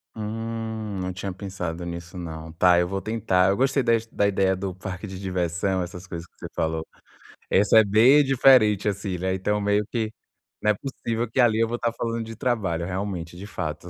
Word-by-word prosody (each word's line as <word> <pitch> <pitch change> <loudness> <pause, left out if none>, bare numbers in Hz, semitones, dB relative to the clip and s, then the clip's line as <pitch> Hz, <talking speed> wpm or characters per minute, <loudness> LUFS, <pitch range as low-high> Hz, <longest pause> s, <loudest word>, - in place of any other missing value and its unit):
Hum, 110 -1 -4
não 90 0 -3
tinha 95 +1 -4
pensado 90 -3 -5
nisso 85 +1 -7
não. 80 -2 -7
Tá, 90 +1 +5
eu 90 - +1
vou 95 +1 -3
tentar. 95 -3 +2
Eu 100 - +1
gostei 135 +1 +2
das 115 -1 +2
da 100 -2 +1
ideia 95 -1 +2
do 95 -1 -4
parque 95 +1 -6
de 95 0 -7
diversão, 90 0 -1
essas 90 +1 -9
coisas 85 -1 -6
que - - -53
você - - -6
falou. 80 0 -1 0.6
Essa 105 +3 +5
é - - +6
bem 120 +9 +6
diferente, 125 -7 +5
assim, 100 -2 -3
né, 95 +1 -1
então 105 +2 0
meio 100 0 +1
que, 110 -3 -1 0.5
não 105 - +3
é - - 0
possível 115 -2 -3
que 125 - -3
ali 115 -3 +4
eu 115 - +3
vou 120 +1 -2
tá 120 0 0
falando 115 0 -2
de 115 0 -8
trabalho, 100 -10 -1
realmente 90 -3 -4
de 100 - -8
fato. 85 -3 -5
100 Hz, 205 wpm, -25 LUFS, 90-115 Hz, 0.6 s, é